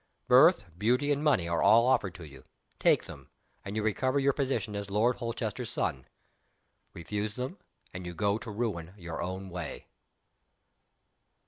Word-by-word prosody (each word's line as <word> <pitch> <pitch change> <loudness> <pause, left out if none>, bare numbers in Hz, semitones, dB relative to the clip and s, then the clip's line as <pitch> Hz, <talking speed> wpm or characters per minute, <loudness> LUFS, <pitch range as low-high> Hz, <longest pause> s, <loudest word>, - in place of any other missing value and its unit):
Birth, - - +6
beauty, 125 +9 +1
and 145 +1 0
money 140 - +3
are 85 -1 0
all 110 +4 +6
offered 105 -8 +2
to 85 -4 -9
you. 70 -2 -14 0.4
Take - - +3
them - - -11 0.3
and 100 +1 -6
you 110 - -1
recover 130 +6 +1
your 140 0 +3
position 120 -7 -1
as 100 -1 -4
Lord 110 +5 +2
Holchester's 115 -1 -4
son. 65 -2 -2 0.9
Refuse 105 +5 -4
them 130 +10 -5 0.3
and 90 0 -6
you 85 - -6
go 100 +3 +1
to 120 - -8
ruin 100 -5 -3
your 85 -3 -6
own 95 +1 -5
way." 90 -2 -6
105 Hz, 155 wpm, -30 LUFS, 90-120 Hz, 0.9 s, Birth